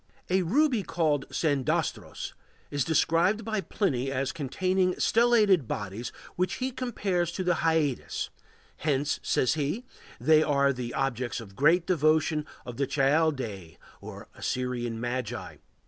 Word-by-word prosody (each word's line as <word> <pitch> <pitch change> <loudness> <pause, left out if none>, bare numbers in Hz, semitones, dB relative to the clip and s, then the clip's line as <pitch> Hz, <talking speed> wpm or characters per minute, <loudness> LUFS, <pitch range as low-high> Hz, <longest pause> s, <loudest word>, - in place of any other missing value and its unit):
] - - -34
A 190 +1 +4
ruby 250 - +2
called 160 -6 0
sandastros 145 -5 -1 0.4
is 145 -2 +1
described 165 - +2
by 215 -3 -1
Pliny 135 - -1
as 135 0 -1
containing 185 +5 0
stellated 215 - +4
bodies 105 +4 -4 0.2
which 180 0 0
he 260 +1 -2
compares 205 -9 -1
to 185 - -2
the 180 -2 +2
Hyades; 160 -5 0 0.5
hence, 145 -1 0
says 125 - +2
he, 160 - -2 0.3
they 155 0 +5
are 140 -2 +3
the 125 -1 -5
objects 125 -3 -1
of 100 -4 -11
great 165 - +4
devotion 155 -2 +2 0.2
with 120 -2 -7
the 140 -1 0
Chaldæi 135 - 0 0.2
or - - -9
Assyrian 120 -2 -2
Magi. 120 -1 -4
155 Hz, 130 wpm, -28 LUFS, 130-185 Hz, 0.5 s, they